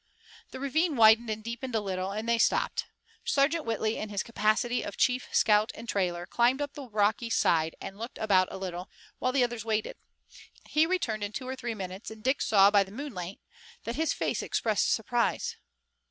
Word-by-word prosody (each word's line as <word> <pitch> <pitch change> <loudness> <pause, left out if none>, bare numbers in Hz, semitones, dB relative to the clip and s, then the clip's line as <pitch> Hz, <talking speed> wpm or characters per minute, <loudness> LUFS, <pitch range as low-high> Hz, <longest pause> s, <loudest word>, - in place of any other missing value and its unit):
The - - -8
ravine 305 +4 +1
widened 225 0 +6
and 215 0 -3
deepened 235 +2 -5
a - - +3
little, 190 -2 -3
and 215 +3 -4
they 235 0 +2
stopped. - - +1 0.4
Sergeant 310 -7 +1
Whitley 220 -1 -1
in 215 - -4
his 200 -2 -2
capacity 230 +2 +1
of 200 - -6
chief 250 0 +1
scout 210 0 +3
and 235 - -9
trailer 175 -4 -1
climbed 240 +7 +2
up 290 -1 -3
the 275 -4 -9
rocky 215 +2 +1
side 160 -6 +2
and 195 +2 -8
looked 230 +2 -6
about 190 -4 +3
a - - -7
little, 180 -1 -5 0.3
while 255 - +1
the 260 -1 +3
others 240 -2 -2
waited. 220 -1 -2 0.7
He 310 +1 +3
returned 235 - -1
in 205 +1 -4
two 255 - -5
or 260 - -3
three 240 -3 -4
minutes, 190 0 -6
and 220 -1 -11
Dick 265 +3 +1
saw, 200 -1 +5
by 205 -1 +5
the 190 - -14
moonlight, 205 -8 -6 0.4
that 230 +2 -4
his 320 0 +1
face - - -1
expressed 215 -3 0
surprise. 235 +1 0
220 Hz, 195 wpm, -29 LUFS, 205-250 Hz, 0.7 s, widened